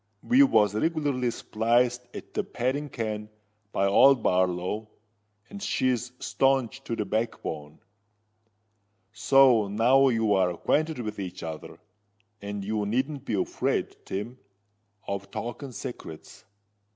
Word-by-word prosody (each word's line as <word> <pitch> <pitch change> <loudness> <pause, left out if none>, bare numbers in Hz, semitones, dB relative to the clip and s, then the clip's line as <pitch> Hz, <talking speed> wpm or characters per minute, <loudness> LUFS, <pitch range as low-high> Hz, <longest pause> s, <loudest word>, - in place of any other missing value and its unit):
We 255 +3 +5
was 105 - +4
regularly 140 -1 0
spliced 120 +2 0
at - - -9
the - - -1
padding 140 +4 -2
ken 105 -3 -4 0.4
by 95 - +1
old 125 +5 +5
Barlow; 90 +4 0 0.6
and 200 - -10
she's 125 - 0
staunch 135 -1 0
to 115 - -2
the 105 - -2
backbone. 85 -8 -3 1.4
So 130 -6 +5
now 120 +7 +4
you're 105 -6 +2
acquainted 155 - 0
with 105 -2 -5
each 95 -2 -6
other; 80 -1 -7 0.6
and 100 -1 -5
you 105 0 -1
needn't 135 +5 -2
be 110 - -1
afraid, 95 - -1
Tim, 115 +6 -5 0.7
of 100 0 -4
talking 120 +6 -6
secrets. 120 - -9
115 Hz, 115 wpm, -27 LUFS, 100-130 Hz, 1.4 s, We